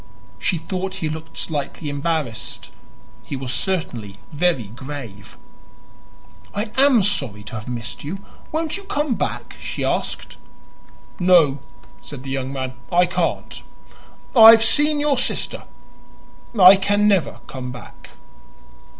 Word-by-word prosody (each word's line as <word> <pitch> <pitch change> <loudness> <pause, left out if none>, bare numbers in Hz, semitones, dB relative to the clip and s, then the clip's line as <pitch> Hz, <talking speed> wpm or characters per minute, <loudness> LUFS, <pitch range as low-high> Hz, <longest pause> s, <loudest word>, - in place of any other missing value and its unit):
She 180 - 0
thought 185 +4 -4
he 165 -5 -3
looked 160 +1 -7
slightly 150 0 -3
embarrassed; 145 -4 -3 0.5
he - - -6
was 130 -1 -4
certainly 120 - -3
very 160 -4 +1
grave. 120 -2 -9 1.2
"I 210 +1 -2
am 265 -5 +5
sorry 135 - -2
to - - -11
have 110 -1 -6
missed 120 -1 -5
you. 160 +7 -4 0.3
Won't 320 +1 -2
you 400 - -10
come 295 -7 0
back?" - - -4
she - - -4
asked. - - -2 0.8
"No," 170 -6 +5 0.4
said 140 -3 -9
the 135 - -6
young 135 0 -3
man, 130 -1 -4 0.2
"I 175 0 +5
can't. 180 - -2 0.7
I 225 -2 +11
have 225 0 +8
seen 295 +6 +3
your 290 -3 +2
sister. - - -1 0.9
I 190 +1 +10
can 205 +2 +2
never 195 -5 +2
come 130 -2 -6
back." 125 - -12
165 Hz, 130 wpm, -21 LUFS, 130-205 Hz, 1.2 s, I